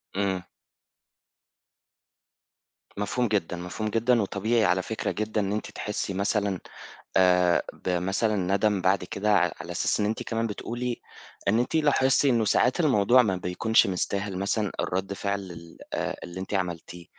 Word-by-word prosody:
إمم. 95 -2 0 2.5
مفهوم 120 +5 0
جدًا، 95 -5 -1
مفهوم 90 +5 -4
جدًا، 115 +1 +2
وطبيعي 110 +3 +1
على 90 +1 +2
فكرة 110 +4 -3
جدًا 110 0 -1
إن 100 -1 -1
أنتِ 105 +1 -3
تحسّي 105 -1 -3
مثلًا 100 0 0 0.6
آآ، 90 -3 +4 0.2
بمثلًا 95 +5 0
ندم 100 +1 +1
بعد 95 0 +2
كده 100 +4 -2
ع 90 -4 +3
على 85 - -8
أساس 90 - 0
إن 105 - +2
أنتِ 110 +1 -2
كمان 115 0 -1
بتقولي 120 +3 -4 0.5
إن 110 +3 +3
أنتِ 125 - -1
لاحظتِ 145 -3 +3
إنه 120 -5 +3
ساعات 125 - +2
الموضوع 125 - +5
ما 100 -5 0
بيكونش 90 +5 +2
مستاهل 100 +1 -2
مثلًا 100 +1 -1
الرَد 95 +2 -1
فعل 100 0 -2
ال 85 -1 -12 0.2
آآ، - - -2
اللي 90 +1 -7
أنتِ 95 +2 -6
عملتيه 90 -2 -3
100 Hz, 145 wpm, -26 LUFS, 90-110 Hz, 2.5 s, الموضوع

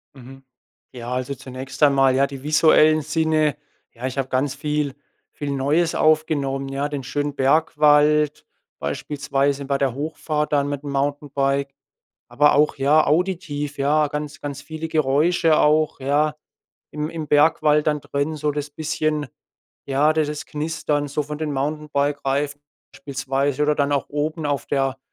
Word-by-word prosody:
Mhm, 135 +1 -13 0.5
ja, 120 -1 -7
also, 130 +2 -2
zunächst 130 +1 -9
einmal 135 -2 +4
ja 140 +1 +3
die 140 -1 -9
visuellen 155 0 +4
Sinne. 155 -1 +1 0.4
Ja, 120 +2 -7
ich 130 +1 -4
habe 135 -1 -1
ganz 135 +2 0
viel 150 -1 -2 0.4
viel 145 - -4
Neues 145 +5 +1
aufgenommen, 145 -3 +1
ja? 140 +2 -2
Den 145 -3 -4
schönen 145 +2 -3
Bergwald 150 +1 +3 0.3
beispielsweise 140 - -2
bei 140 0 0
der 135 -3 0
Hochfahrt 150 +1 -3
dann 140 -1 +2
mit 145 0 -4
'm 145 - -5
Mountainbike, 140 0 -1 0.5
aber 145 +5 +3
auch 150 +1 +2
ja 145 +3 +4
auditiv, 155 -4 -1
ja, 150 +2 +2
ganz 150 0 -6
ganz 145 -1 -5
viele 160 0 -6
Geräusche 155 +2 +2
auch, 155 0 +2
ja? 150 +3 +1 0.6
Im 150 +1 -3
im 160 -3 -6
Bergwald 150 0 +3
dann 150 -1 +1
drin 145 +3 -2
so 150 0 -1
das 145 0 -4
bisschen 155 0 -2 0.6
ja, 140 +3 +2
d 155 0 +2
das 150 0 -5
Knistern 150 -1 -2
so 145 +1 -2
von 150 +1 -6
den 155 -2 -2
Mountainbike-Reifen 145 0 -1 0.3
beispielsweise 135 +1 -2
oder 150 0 +3
dann 145 0 0
auch 140 -1 +1
oben 155 +2 -2
auf 145 -1 -2
der 135 -1 0
145 Hz, 150 wpm, -22 LUFS, 140-150 Hz, 0.6 s, einmal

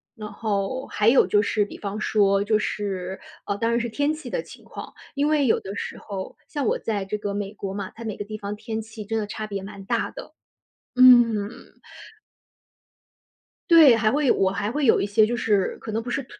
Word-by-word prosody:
然 215 -3 -8
后 215 +4 -2
还 210 +1 +2
有 255 - +5
就 205 - +3
是 210 0 +1
比 - - -10
方 205 +1 -4
说， 200 -2 +2
就 215 +1 +2
是， 190 -3 -3 0.3
呃， 200 - -1
当 230 +2 0
然 235 - +2
是 235 0 -2
天 290 +6 0
气 310 0 -8
的 - - -2
情 - - -14
况， - - -9 0.2
因 285 +1 +1
为 300 -3 +2
有 - - +3
的 195 +1 -7
时 - - -5
候 195 -2 -7
像 290 -3 -3
我 - - +1
在 205 -3 -2
这 210 +2 -3
个 205 -1 -4
美 200 0 -4
国 195 -1 -5
嘛， 200 -1 -5
它 230 - -9
每 215 - -4
个 - - -4
地 215 +1 -6
方 205 0 -5
天 220 +1 -5
气 220 0 -9
真 225 +2 -2
的 210 - -2
差 215 +1 -5
别 200 -2 -5
蛮 200 0 -9
大 - - -1
的。 - - -10 0.6
嗯。 240 -5 +6 2.2
对， 310 -8 +8
还 220 -1 +2
会 290 0 +1
有 - - +6
我 190 -1 +2
还 200 +3 -2
会 290 +2 -1
有 - - +4
一 - - 0
些 210 +2 +4
就 240 - -1
是， 205 -5 0
可 220 - -6
能 225 - -1
不 240 - -7
是 270 +2 -2
215 Hz, 240 characters per minute, -24 LUFS, 200-240 Hz, 2.2 s, 对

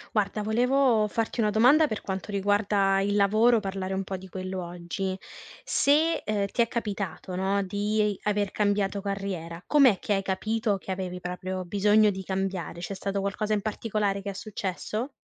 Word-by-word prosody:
Guarda, 210 0 0
volevo 240 0 +3
farti 225 +3 -2
una 215 -2 +3
domanda 250 +9 +5
per 215 - -4
quanto 190 +1 -5
riguarda 200 -1 +2
il 205 +1 0
lavoro, 215 +4 +4
parlare 190 -2 -3
un 195 - -1
po' 195 0 -5
di 190 0 -9
quello, 185 0 -4
oggi. 175 +2 -4 0.5
Se, 315 +3 +3
ehm, 210 -1 0
ti - - +2
è 230 - +3
capitato, 200 -6 -4
no, 195 +2 +1
di 205 +2 0
aver 205 -2 0
cambiato 205 -1 0
carriera, 190 -4 -4
com'è 270 -9 +5
che 205 - -1
hai 195 - +1
capito 215 +2 -1
che 190 - -7
avevi 185 -1 -4
proprio 185 +1 -4
bisogno 210 +3 +4
di 190 0 -6
cambiare, 190 -3 -3
c'è 180 +3 -5
stato 195 +1 -2
qualcosa 205 +2 -1
in 210 - +1
particolare 210 -2 -1
che 200 - -5
è - - -4
successo? 210 +5 -4
200 Hz, 175 wpm, -27 LUFS, 190-215 Hz, 0.5 s, domanda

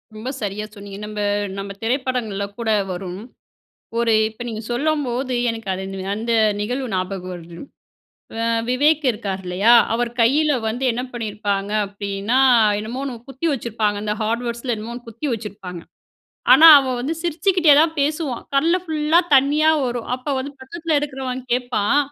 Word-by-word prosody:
ரொம்ப 220 +4 -5
சரியா 210 0 -3
சொன்னீங்க. 200 -1 -9
நம்ப 210 0 -6 0.4
நம்ப 200 0 -5
திரைப்படங்கள்ள 240 -5 -1
கூட 230 -1 -2 0.2
வரும். 180 +1 -6 0.8
ஒரு 235 -1 +2 0.2
இப்ப 220 +2 -10
நீங்க 220 0 -5
சொல்லும்போது, 260 -2 -1 0.2
எனக்கு 225 -2 -7
அது 190 +1 -5 0.3
அந்த 230 +2 -2 0.3
நிகழ்வு 250 +5 -2
ஞாபகம் 185 0 -3
வருது. 170 0 -11 0.8
அ, - - 0 0.3
விவேக் 295 +4 +3
இருக்கார் 200 -4 -4
இல்லையா, 195 +6 +3 0.2
அவர் 240 0 -1
கையில 295 +6 +3 0.2
வந்து, 245 +4 -3
என்ன 240 +2 -3
பண்ணிருப்பாங்க 205 -3 -3
அப்டின்னா, 200 +4 -2 0.4
என்னமோ 235 +5 -5
ஒண்ணு 265 -3 -4
குத்தி 270 +5 -4
வச்சிருப்பாங்க. 220 -5 -1
இந்த 210 0 -1
ஹார்ட்வேர்ட்ஸுல 235 +2 -2
என்னமோ 220 +2 -7
ஒண்ணு 240 0 -10
குத்தி 230 +7 -6
வச்சிருப்பாங்க. 200 -5 -8 0.7
ஆனா 290 +6 +9
அவன் 260 -3 -1
வந்து 285 +6 -2
சிரிச்சுக்கிட்டே 345 -1 +3
தான் 325 +1 +3
பேசுவான். 290 -3 -1
கண்ல 325 +6 +3
ஃபுல்லா 315 0 +2 0.2
தண்ணியா 295 +4 +4 0.2
வரும். 240 -1 -4
அப்போ 255 +3 -6
வந்து, 265 +2 -4
பக்கத்தில 325 +3 -3
இருக்குறவன் 265 -3 -4
கேப்பான். 245 +1 +1
240 Hz, 145 wpm, -21 LUFS, 210-275 Hz, 0.8 s, ஆனா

